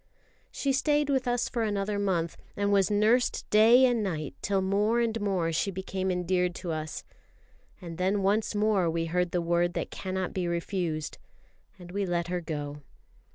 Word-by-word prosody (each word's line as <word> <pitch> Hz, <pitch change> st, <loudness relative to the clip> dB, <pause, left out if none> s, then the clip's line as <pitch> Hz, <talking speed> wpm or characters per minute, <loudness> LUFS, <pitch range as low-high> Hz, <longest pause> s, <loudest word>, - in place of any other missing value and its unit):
She 275 Hz, -1 st, -1 dB
stayed 290 Hz, +1 st, +2 dB
with 265 Hz, -2 st, 0 dB
us 245 Hz, 0 st, +1 dB
for 240 Hz, -, -2 dB
another 205 Hz, -1 st, -1 dB
month, 175 Hz, -5 st, 0 dB, 0.2 s
and 205 Hz, 0 st, +1 dB
was 195 Hz, 0 st, +3 dB
nursed 215 Hz, +4 st, +2 dB
day 230 Hz, +5 st, +7 dB
and 240 Hz, -3 st, +2 dB
night 155 Hz, -8 st, -3 dB
till 195 Hz, -1 st, +1 dB
more 205 Hz, +4 st, +2 dB
and 230 Hz, -2 st, 0 dB
more 185 Hz, -5 st, 0 dB
she 170 Hz, +5 st, 0 dB
became 190 Hz, 0 st, -3 dB
endeared 180 Hz, 0 st, 0 dB
to 180 Hz, -3 st, -4 dB
us; 155 Hz, -1 st, -4 dB, 0.8 s
and 170 Hz, -1 st, -8 dB
then 195 Hz, +2 st, +1 dB
once 210 Hz, +2 st, +1 dB
more 205 Hz, -4 st, +2 dB
we 165 Hz, 0 st, -1 dB
heard 180 Hz, +2 st, 0 dB
the 175 Hz, 0 st, -1 dB
word 175 Hz, +1 st, +1 dB
that -, -, -3 dB
cannot 190 Hz, -1 st, -3 dB
be 180 Hz, -2 st, -1 dB
refused, 170 Hz, -3 st, -3 dB, 0.6 s
and 175 Hz, -1 st, -11 dB
we 200 Hz, 0 st, -2 dB
let 175 Hz, -1 st, -1 dB
her 180 Hz, -1 st, -1 dB
go. 145 Hz, -3 st, -5 dB
190 Hz, 175 wpm, -28 LUFS, 175-210 Hz, 0.8 s, day